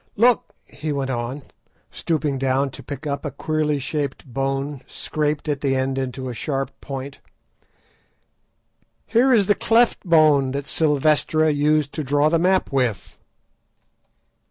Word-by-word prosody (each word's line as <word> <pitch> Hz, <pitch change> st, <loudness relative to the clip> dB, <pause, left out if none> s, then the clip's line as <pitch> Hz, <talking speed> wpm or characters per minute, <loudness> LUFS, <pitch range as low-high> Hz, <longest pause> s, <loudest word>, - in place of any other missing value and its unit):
Look!" 235 Hz, +1 st, +2 dB
he 155 Hz, 0 st, -5 dB
went 135 Hz, -2 st, -2 dB
on, 125 Hz, +3 st, -4 dB, 0.5 s
stooping 150 Hz, -4 st, -1 dB
down 135 Hz, +1 st, +1 dB
to -, -, -10 dB
pick 145 Hz, +1 st, -8 dB
up 140 Hz, -1 st, -3 dB
a 150 Hz, -, -2 dB
queerly 155 Hz, 0 st, -1 dB
shaped 140 Hz, +1 st, -3 dB
bone 135 Hz, +1 st, -3 dB
scraped 150 Hz, 0 st, -2 dB
at 145 Hz, -2 st, -1 dB
the 135 Hz, -2 st, +1 dB
end 130 Hz, 0 st, -1 dB
into 130 Hz, 0 st, -4 dB
a 125 Hz, -, -4 dB
sharp 135 Hz, +3 st, -3 dB
point, 135 Hz, 0 st, -7 dB, 1.9 s
"here 250 Hz, +4 st, +3 dB
is 220 Hz, -5 st, +5 dB
the 205 Hz, -, +4 dB
'cleft 230 Hz, +3 st, +3 dB
bone' 155 Hz, -7 st, +4 dB
that 140 Hz, 0 st, -3 dB
Silvestra 155 Hz, +1 st, +2 dB
used 150 Hz, 0 st, +1 dB
to 155 Hz, -, -3 dB
draw 145 Hz, +2 st, +2 dB
the 165 Hz, +1 st, +2 dB
map 185 Hz, 0 st, +2 dB
with." 125 Hz, -7 st, -1 dB
145 Hz, 140 wpm, -22 LUFS, 135-155 Hz, 1.9 s, is